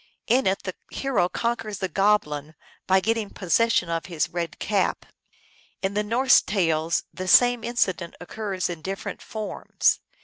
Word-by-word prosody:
In 255 0 +3
it 190 +1 0
the 185 - -4 0.2
hero 245 -10 0
conquers 230 -2 -2
the 190 - -2
goblin 160 -6 +1 0.3
by 190 0 +4
getting 225 0 0
possession 205 0 +1
of 165 -1 -3
his 165 -4 -1
red 170 -1 -4
cap. 200 -3 0 0.8
In 190 +1 0
the 210 - +1
Norse 245 +5 +4
tales 165 -4 0
the 185 0 -5
same 245 +3 +5
incident 190 -8 -1
occurs 190 +1 -3
in 170 -3 -6
different 195 +4 -5
forms. 215 -1 -1
195 Hz, 145 wpm, -25 LUFS, 175-225 Hz, 0.8 s, same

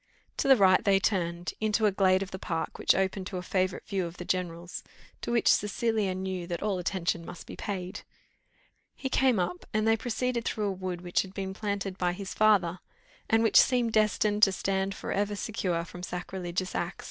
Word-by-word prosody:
To - - 0
the 270 - +8
right 190 -4 +5
they 195 -1 +4
turned, 175 -3 -1
into 215 0 +2
a 210 - +4
glade 190 -1 +3
of 195 - -9
the 190 - -6
park, 165 -2 -3
which - - +4
opened 190 0 -1
to 185 - -5
a 180 - -4
favourite 185 0 -1
view 190 -3 -1
of 170 +1 -11
the 175 - -7
general's, 175 -1 -3 0.4
to - - -3
which 235 -1 +2
Cecilia 210 -2 +2
knew 185 -2 -4
that 170 +1 -4
all 200 -3 0
attention 175 -2 -1
must 175 - -9
be - - -9
paid. 185 -3 -5 0.9
He 265 - -4
came 260 -2 +3
up, 180 -1 -2
and 215 0 +2
they 225 - +5
proceeded 245 +1 -2
through 215 -2 -1
a - - -1
wood 185 -2 -4
which 175 -1 +1
had 190 0 -10
been 190 -1 -3
planted 200 -2 -3
by 180 -1 +1
his 195 +1 -6
father, 190 -5 +3 0.5
and 225 0 +4
which 225 - +7
seemed 245 -3 +1
destined 210 -1 +2
to 195 - +7
stand 195 0 -1
for - - -5
ever 205 +1 0
secure 185 -6 -2
from 180 - -10
sacrilegious 180 0 -4
axe. 175 +1 -2
190 Hz, 205 wpm, -29 LUFS, 180-210 Hz, 0.9 s, the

